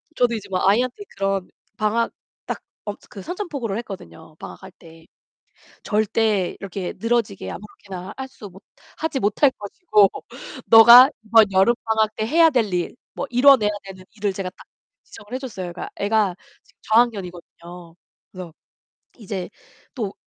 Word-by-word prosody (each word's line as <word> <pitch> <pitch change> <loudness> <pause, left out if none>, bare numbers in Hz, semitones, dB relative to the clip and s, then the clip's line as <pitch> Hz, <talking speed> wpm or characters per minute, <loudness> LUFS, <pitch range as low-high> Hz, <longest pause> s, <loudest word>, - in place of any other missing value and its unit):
저도 240 -1 +2
이제 205 -2 -7
뭐 185 -1 -1
아이한테 245 - +1
그런 195 -1 -1 0.3
방학 220 +2 0 0.3
딱 - - -5 0.2
어 205 - -4
그 200 - -10
선전포고를 290 - -4
했거든요 160 - -10
방학할 190 - -10
때. 165 -1 -17 1.2
절대 205 -5 0
이렇게 195 -2 -5
늘어지게 230 -4 -1
아무렇게나 190 -2 -9
할 265 0 -6
수 215 -5 -12
못 190 +1 -17 0.3
하지 320 -3 -2
못할 250 +5 +3
것이고 210 - +2 0.6
너가 235 +4 +9
이번 220 -1 +5
여름방학 220 +2 +2
때 215 - -2
해야 325 +6 +5
될 230 -8 0
일, 175 -1 -2 0.2
뭐 - - -4
이뤄내야 250 -3 +5
되는 190 -1 -11
일을 205 -2 -1
제가 190 -1 -5
딱 - - -17 0.4
지정을 210 - -15
해 - - -1
줬어요. 190 -9 -6
그러니까 175 - -7
애가 205 -3 +1 0.3
지금 - - -30
저학년이거든요. 180 -6 -2 0.4
그래서 185 -3 -9 0.6
이제 195 -5 -6 0.5
또 215 -7 -4
210 Hz, 315 characters per minute, -22 LUFS, 190-235 Hz, 1.2 s, 너가